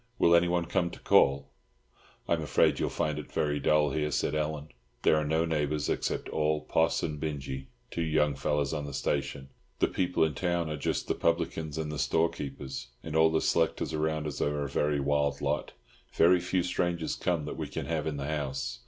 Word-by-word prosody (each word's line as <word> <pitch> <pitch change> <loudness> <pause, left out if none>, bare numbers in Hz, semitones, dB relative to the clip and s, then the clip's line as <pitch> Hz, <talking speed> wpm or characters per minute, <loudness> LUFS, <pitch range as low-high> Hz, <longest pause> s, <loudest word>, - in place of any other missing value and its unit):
Will 85 - +5
anyone 85 0 +3
come 85 +1 0
to - - -11
call?" 70 +1 +3 0.8
"I'm - - +1
afraid - - +2
you'll - - 0
find 75 -1 -1
it 75 - -9
very 75 -1 0
dull 75 +1 +3
here," 75 +1 0
said 75 - 0
Ellen. 75 -1 -2 0.3
"There - - +5
are 75 - +1
no 80 +2 +2
neighbours 75 -2 0
at - - -2
all 75 0 +1
except 75 - -12
Poss 80 0 +3
and 75 -2 -3
Binjie, 70 -3 -4 0.2
two 85 - -2
young 75 -2 +2
fellows 70 +1 -1
on 75 -2 -3
the - - -6
next 70 -2 -4
station. 70 -1 -2 0.3
The - - +3
people 90 -2 +1
in 80 -1 +1
town 85 0 -1
are - - -2
just 75 - -2
the - - +1
publicans 80 -2 -1
and 80 -1 -2
the 75 - -4
storekeeper, 75 -4 -1 0.4
and 80 -1 -5
all 80 0 +6
the 80 0 +1
selectors 80 -1 +1
around 80 0 -1
us 75 -3 -4
are 75 0 0
a - - -2
very 75 +1 0
wild 70 0 +1
lot. - - -2 0.4
Very 90 +2 +5
few 90 +1 0
strangers 85 -2 -1
come 85 -4 -1
that - - -5
we - - -3
can - - -5
have 80 -2 -2
in 75 -2 -2
the 70 - -3
house. 75 -3 -3
75 Hz, 205 wpm, -29 LUFS, 75-80 Hz, 0.8 s, all